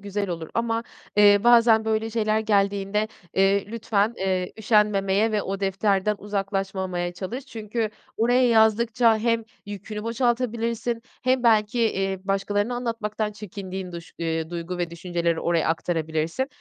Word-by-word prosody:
güzel 200 0 -3
olur 165 -2 -5
ama, 230 0 0 0.3
eee, 205 -1 +7
bazen 230 -2 +6
böyle 220 0 0
şeyler 215 -1 +1
geldiğinde, 205 0 +1 0.3
eee, 195 +1 +3
lütfen, 220 0 0
eee, 185 -1 -1
üşenmemeye 210 -1 +2
ve 210 - +1
o 195 +1 -4
defterden 195 +1 +1
uzaklaşmamaya 195 -3 -2
çalış. 230 +10 -6
Çünkü 220 -2 -3 0.3
oraya 245 +3 +3
yazdıkça 225 +1 +4
hem 230 0 0 0.2
yükünü 205 +1 -6
boşaltabilirsin 235 0 -1 0.2
hem 255 0 +2
belki, 220 0 +3
eee, 195 -4 0
başkalarına 205 +4 0
anlatmaktan 225 -3 -3
çekindiğin 190 -3 -7
duş 170 -1 -9
eee, 160 -1 -2
duygu 175 +1 -5
ve 175 -1 -2
düşünceleri 170 -1 -2
oraya 170 -2 +1
aktarabilirsin. 160 - -1
210 Hz, 130 wpm, -24 LUFS, 190-225 Hz, 0.3 s, eee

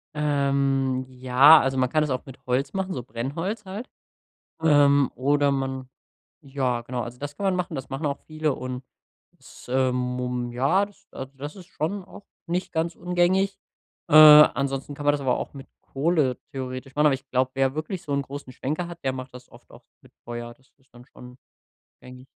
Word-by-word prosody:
Ähm, 140 -3 +1
ja, 130 +4 +6
also 135 0 -1
man 130 -1 +2
kann 155 +3 +2
es 150 - -2
auch 130 0 -2
mit 135 -2 -12
Holz 130 +3 0
machen, 190 -1 -2
so 125 - -5
Brennholz 150 - -4
halt. 200 +7 -7 0.7
Ähm, 145 -3 +4
oder 145 +3 +2
man 135 -1 -3 0.5
ja 135 -4 -2
genau, 120 +1 -4
also 120 +1 -8
das 145 +1 -6
kann 200 - -7
man 190 -2 +2
machen, 180 -3 -3
das 135 -1 -6
machen 135 +3 -4
auch 140 -1 -2
viele 155 -2 -1
und, 130 0 -6 0.6
es, - - -15
ähm, 130 0 +2
mum 125 -1 -3
ja, 140 +11 +2
das 205 - -22
also, 130 0 -8
das 145 +5 -7
ist 185 -3 -12
schon 185 +2 -4
auch 195 +2 -14 0.2
nicht 180 +2 -3
ganz 165 +1 -1
ungängig. 180 +3 +1 0.5
Äh, - - 0
ansonsten 145 -2 +7
kann 145 - -8
man 145 - +5
das 145 - -2
aber 130 -2 +1
auch - - -6
mit 135 0 -10
Kohle 140 -3 0
theoretisch 130 0 -6
machen, 150 +1 +3
aber 145 - +4
ich 135 0 -8
glaube, 130 0 +1
wer 135 0 +1
wirklich 160 +4 -4
so 145 - -5
'n 140 0 +1
großen 140 -1 -9
Schwenker 155 +7 -3
hat, 170 0 -10
der 135 - +1
macht 130 -1 -8
das 125 0 -12
oft - - -18
auch - - -16 0.2
mit - - -20
Feuer, 120 0 -7
das 130 +2 -31
ist 135 -1 -34
dann 120 0 -14
schon 125 -1 -14 0.6
gängig. 125 0 -13
140 Hz, 200 wpm, -25 LUFS, 130-155 Hz, 0.7 s, ansonsten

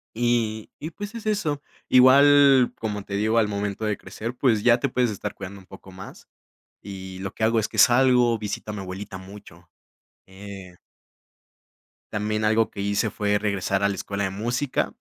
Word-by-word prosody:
Y 115 -2 0
y, 155 +3 -6
pues, 205 +6 -8
es 230 - -8
eso. 185 -10 -1 0.3
Igual, 135 0 +6
como 105 -2 -4
te 100 - -8
digo, 110 +3 +1
al 110 - +3
momento 100 +1 -3
de 105 -2 -1
crecer, 110 +6 -7
pues, 125 -4 +2
ya 120 -1 +5
te - - -2
puedes 125 -1 +1
estar 105 0 -5
cuidando 100 0 -9
un - - -19
poco 95 0 -14
más, 95 +1 -12 0.5
y 95 -1 -9
lo 95 0 -5
que 110 - -1
hago 115 +1 +2
es 110 - 0
que - - -10
salgo, 120 -1 +5
visito 105 0 -5
a 105 - -5
mi 105 - -5
abuelita 95 +1 -7
mucho. 95 -3 -14 0.6
Eh 95 -2 -11 1.4
También 105 +1 -1
algo 110 +1 +2
que 100 - -7
hice 100 +2 0
fue 105 0 0
regresar 100 -1 -1
a 100 - +3
la 100 - -2
escuela 100 0 -3
de 95 - -3
música. 120 +7 -2
105 Hz, 185 wpm, -24 LUFS, 100-120 Hz, 1.4 s, Igual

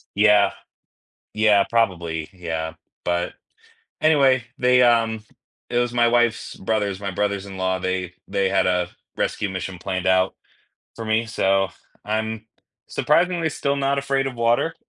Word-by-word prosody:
Yeah 100 -1 +5 0.8
yeah, 105 -2 +4
probably, 85 -8 0
yeah, 80 -3 -4 0.3
but 85 0 -1 0.7
anyway, 135 -5 +4
they, 125 0 +4
um 115 -2 +3 0.5
it 120 - +1
was 120 0 -1
my 120 -1 +3
wife's 120 -1 +1
brothers 100 -1 -1
my 100 -1 -3
brothers-in-law, 95 -1 -2
they 95 -1 -2
they 100 -1 +1
had, 95 -1 +2
uh, 90 -1 +1 0.3
rescue 105 - -1
mission 95 -1 -5
planned 95 0 -3
out 95 0 +3 0.6
for 115 - -6
me, 110 +1 +1
so, 95 -3 +1 0.4
I'm 110 +1 -2 0.4
surprisingly 170 +1 +1
still 140 0 -1
not 140 0 +1
afraid 135 0 0
of 130 - -4
water. 120 +7 +1
105 Hz, 135 wpm, -22 LUFS, 95-120 Hz, 0.8 s, Yeah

